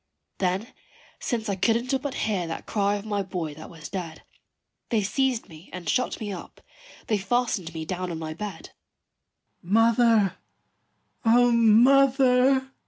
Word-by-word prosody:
Then 190 +5 -1 0.5
since 230 -3 -2
I 200 - 0
couldn't 235 +7 +1
but 280 -1 -4
hear 195 -6 -1
that 165 - -6
cry 205 -1 0
of 205 0 -6
my 205 -2 -1
boy 175 -5 -4
that 155 +2 -11
was 160 -2 -10
dead, 170 -5 -6 0.7
They 220 -3 +1
seized 255 +3 0
me 165 0 -14
and 180 -2 -8
shut 250 +10 0
me 210 -3 -4
up: 180 - -10 0.5
they 215 -2 0
fastened 210 -5 -1
me 160 0 -4
down 185 +1 -4
on 170 - -4
my 160 -1 -5
bed. 195 -1 -7 0.9
"Mother, 225 0 +3 0.9
O 240 +1 +5
mother!" 260 +3 +4
210 Hz, 145 wpm, -25 LUFS, 180-245 Hz, 0.9 s, O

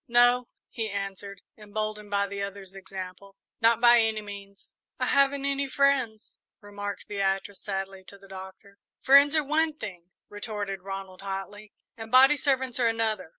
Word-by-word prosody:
"No," 245 0 +4 0.2
he 225 -3 -3
answered, 200 0 -5
emboldened 210 0 -5
by 200 0 +1
the 200 0 -5
other's 200 -1 -6
example; 195 0 -9 0.3
"not 230 0 +4
by 240 0 +7
any 220 -1 0
means." 200 -1 -11 0.3
"I - - +1
haven't 275 0 +2
any 280 0 -1
friends," 260 -6 +1 0.2
remarked 205 -1 -7
Beatrice, 195 0 -2
sadly, 195 -1 -4
to 200 - -12
the 195 0 -17
Doctor. 190 +1 -11 0.2
"Friends 280 +3 +7
are 310 - +3
one 310 +2 +1
thing," 180 - -8 0.2
retorted 205 -2 -5
Ronald, 195 -1 -7
hotly, 200 +2 -6 0.3
"and 225 -1 -8
body 265 +3 +7
servants 260 -3 0
are 240 - +3
another. 225 -6 -1
205 Hz, 150 wpm, -27 LUFS, 195-240 Hz, 0.3 s, by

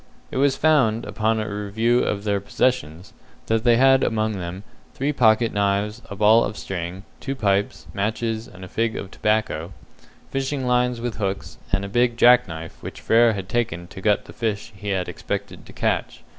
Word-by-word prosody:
It - - -4
was 140 0 +3
found, 130 -8 +3
upon 110 +1 0
a 110 - -2
review 110 +4 0
of 100 -4 -1
their 100 -1 0
possessions, 95 -6 -1 0.3
that 110 0 0
they 120 -1 +5
had 135 +1 +5
among 110 0 +1
them 95 -1 -5 0.3
three 140 +3 -1
pocket 115 -3 +3
knives, 100 +2 0
a 100 - -6
ball 110 +3 +5
of 105 - -4
string, 90 +1 -5 0.2
two 135 0 -4
pipes, 100 - 0
matches 110 +2 -2
and 95 -6 -11
a - - -10
fig 115 +4 -1
of 95 - -6
tobacco, 100 -6 -1 0.6
fishing 135 0 -2
lines 125 -1 +1
with 120 -1 -4
hooks, 95 -6 -4
and 100 - +1
a - - -4
big 120 +3 +1
jack 125 0 +6
knife 80 -1 -8
which - - -8
Frere 115 0 +4
had 100 -2 -5
taken 95 -7 -1
to 95 - -10
gut 105 0 +2
the - - -12
fish 110 -3 -3
he 100 +1 -6
had 95 -2 -1
expected - - -5
to - - -11
catch. - - -2
110 Hz, 185 wpm, -23 LUFS, 100-120 Hz, 0.6 s, jack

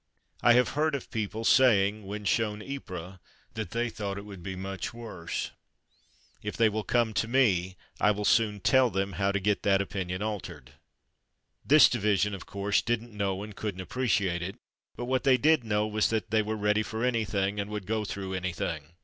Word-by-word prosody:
I 120 - +6
have 125 +1 +4
heard 155 0 0
of 135 - -7
people 110 0 -3
saying, 105 -6 +4
when 105 +1 -5
shown 105 0 0
Ypres, 95 -9 -7 0.3
that - - -4
they 120 +3 -1
thought 100 -3 -4
it 100 - -7
would 100 -3 -10
be 95 +2 -5
much 95 +3 -5
worse. 110 -8 -5 0.9
If - - -5
they 115 -1 +5
will 110 0 -3
come 120 -1 +1
to 115 - 0
me, 95 -8 +2 0.2
I 105 - +4
will 105 0 0
soon 105 -3 +2
tell 130 +4 +4
them 95 0 -1
how 100 +2 0
to 100 - 0
get 100 +1 0
that 100 -1 +3
opinion 95 -1 -3
altered. 90 - -5 0.9
This 155 +2 +7
division, 105 -3 +1
of 95 - -7
course, 100 +1 0
didn't 120 0 -2
know 100 -1 -2
and 105 -1 -9
couldn't 100 -3 -4
appreciate 100 -5 0
it, 95 +3 -4 0.4
but 120 - -5
what 130 +1 0
they 130 -2 +5
did 155 -1 +3
know 105 -1 +1
was 110 0 +1
that 110 -3 -2
they 110 0 +4
were 110 +1 -2
ready 105 +1 +2
for 110 +1 -4
any 120 -3 +1
thing, 100 0 -1
and 100 0 -3
would 105 -2 -5
go 110 +1 -1
through 95 -2 -5
anything. 85 -4 -4
105 Hz, 195 wpm, -28 LUFS, 95-115 Hz, 0.9 s, This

